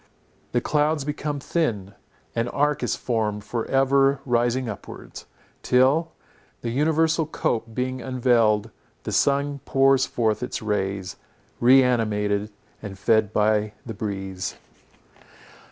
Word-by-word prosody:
The 120 Hz, -, +1 dB
clouds 150 Hz, 0 st, +1 dB
become 150 Hz, 0 st, -3 dB
thin; 110 Hz, -, -2 dB, 0.4 s
an 115 Hz, 0 st, 0 dB
arch 145 Hz, +3 st, 0 dB
is -, -, 0 dB
formed 105 Hz, -3 st, -2 dB
for 115 Hz, +1 st, -3 dB
ever 135 Hz, 0 st, +3 dB
rising 120 Hz, 0 st, +1 dB
upwards, 105 Hz, -4 st, -9 dB, 0.3 s
till, 140 Hz, +6 st, +3 dB, 0.5 s
the 115 Hz, -, -3 dB
universal 160 Hz, +3 st, +2 dB
cope 115 Hz, -7 st, -2 dB
being 130 Hz, 0 st, -2 dB
unveiled, 115 Hz, -4 st, +2 dB, 0.3 s
the -, -, -4 dB
sun 140 Hz, 0 st, +1 dB
pours 135 Hz, -1 st, +3 dB
forth 110 Hz, -3 st, 0 dB
its 125 Hz, -, -3 dB
rays, 100 Hz, -3 st, -2 dB, 0.4 s
re 130 Hz, +2 st, +6 dB
animated 105 Hz, -4 st, 0 dB, 0.3 s
and 100 Hz, -2 st, -7 dB
fed 110 Hz, +1 st, +2 dB
by 105 Hz, 0 st, +1 dB
the 115 Hz, -, -5 dB
breeze. 95 Hz, -3 st, -4 dB
120 Hz, 120 wpm, -24 LUFS, 105-135 Hz, 0.5 s, re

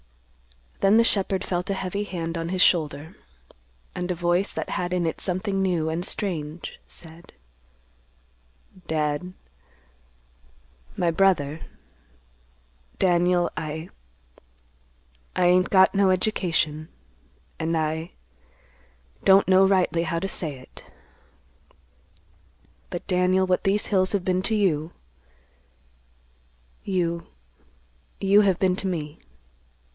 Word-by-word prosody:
Then 200 Hz, +3 st, +4 dB
the 230 Hz, -, +6 dB
shepherd 195 Hz, -3 st, 0 dB
felt 180 Hz, +1 st, -2 dB
a 195 Hz, -, 0 dB
heavy 195 Hz, +2 st, -3 dB
hand 170 Hz, -4 st, -4 dB
on 165 Hz, 0 st, -3 dB
his 185 Hz, 0 st, +2 dB
shoulder, 155 Hz, -1 st, +1 dB, 0.8 s
and 180 Hz, 0 st, -4 dB
a 180 Hz, -, 0 dB
voice, 175 Hz, +3 st, +1 dB
that -, -, -5 dB
had 180 Hz, 0 st, -2 dB
in 180 Hz, -1 st, 0 dB
it 160 Hz, -, -3 dB
something 195 Hz, +1 st, -1 dB
new 175 Hz, -4 st, 0 dB
and 165 Hz, +2 st, -2 dB
strange, 165 Hz, -5 st, -2 dB
said, 165 Hz, 0 st, -8 dB, 1.5 s
"Dad,—my 65 Hz, -, -6 dB
brother,—Daniel, 65 Hz, -, -2 dB
I—I 160 Hz, +2 st, -6 dB, 1.5 s
ain't 180 Hz, +1 st, +4 dB
got 190 Hz, -1 st, +5 dB
no 195 Hz, -1 st, +3 dB
education, 165 Hz, -5 st, 0 dB, 0.7 s
an' 165 Hz, +1 st, -1 dB
I—don't 65 Hz, -, -2 dB
know 190 Hz, +1 st, +5 dB
rightly 185 Hz, -3 st, +2 dB
how 170 Hz, 0 st, -2 dB
to 190 Hz, +3 st, -2 dB
say 155 Hz, -7 st, -3 dB
it—but, 85 Hz, -, -16 dB
Daniel, 185 Hz, +1 st, +2 dB
what 185 Hz, -1 st, 0 dB
these 200 Hz, +2 st, +2 dB
hills 185 Hz, -1 st, +1 dB
have 195 Hz, -3 st, -1 dB
been 185 Hz, 0 st, +1 dB
to 220 Hz, +3 st, +1 dB
you, 170 Hz, -6 st, 0 dB, 1.9 s
you—you 165 Hz, -, -2 dB
have 195 Hz, -4 st, +2 dB
been 185 Hz, -1 st, +2 dB
to 195 Hz, -, 0 dB
me. 155 Hz, -5 st, -4 dB
170 Hz, 100 wpm, -24 LUFS, -, 1.9 s, the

